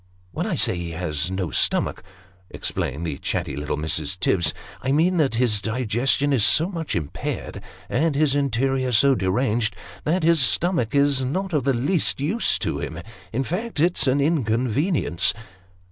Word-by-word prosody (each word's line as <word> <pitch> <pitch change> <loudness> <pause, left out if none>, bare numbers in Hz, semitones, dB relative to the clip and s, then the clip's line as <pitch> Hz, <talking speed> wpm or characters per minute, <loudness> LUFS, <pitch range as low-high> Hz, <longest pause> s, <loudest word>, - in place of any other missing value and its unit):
" 90 0 -33
When - - -3
I - - -1
say - - +3
he 85 -1 -5
has 80 -1 -2
no 95 -4 -3
stomach," - - +1 0.5
explained 80 +6 -3
the 75 -4 -4
chatty - - -2
little 75 +1 -3
Mrs. 80 +3 -2
Tibbs, 85 -5 +2 0.2
" - - -18
I 130 - -1
mean 170 +5 +3
that 140 -7 +2
his 115 -4 +1
digestion 125 +5 +1
is 120 -6 +2
so 160 - +4
much 165 -5 -4
impaired, 75 -5 -4 0.3
and 150 +3 0
his 145 -1 +2
interior 135 -1 0
so 135 +5 +5
deranged, 110 +1 0 0.3
that 165 +3 0
his 165 0 +4
stomach 130 - +1
is 140 -2 +3
not 180 +8 -2
of 145 -5 0
the 135 -2 +2
least 145 +8 0
use 175 +12 +1
to 70 - -2
him; 75 +3 -5 0.3
in 130 +4 -1
fact, 185 - -4
it's 170 -2 +2
an 130 +2 +3
inconvenience." 130 - +1
130 Hz, 170 wpm, -23 LUFS, 95-150 Hz, 0.5 s, so